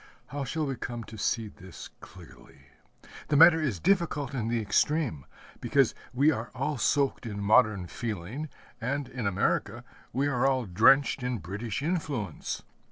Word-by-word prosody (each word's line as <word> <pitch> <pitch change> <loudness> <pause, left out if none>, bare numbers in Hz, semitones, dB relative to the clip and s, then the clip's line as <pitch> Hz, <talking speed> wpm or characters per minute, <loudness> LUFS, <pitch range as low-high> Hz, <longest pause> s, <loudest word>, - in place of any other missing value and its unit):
How 140 +1 -4
shall 155 +4 -2
we 135 -3 -3
come 120 -1 -5
to 110 - -11
see 110 +1 0
this 95 -2 -11
clearly? - - -15 0.6
The 150 - +2
matter 165 +1 +8
is 125 - -1
difficult 170 -7 +1
in 120 -4 -2
the 115 0 0
extreme; 110 - 0 0.3
because - - +2 0.2
we 140 +5 +4
are 120 -4 -4
all 140 +1 -2
soaked 140 -3 +1
in 105 -2 -5
modern 100 -2 +3
feeling, 115 - -5 0.3
and 140 +3 -2
in 120 -4 -4
America 100 +3 0 0.3
we 135 +3 0
are 130 -1 +1
all 130 -3 +1
drenched 115 +9 +4
in 125 -1 -2
British 105 - -5
influence. 145 - -3
125 Hz, 155 wpm, -28 LUFS, 105-145 Hz, 0.6 s, matter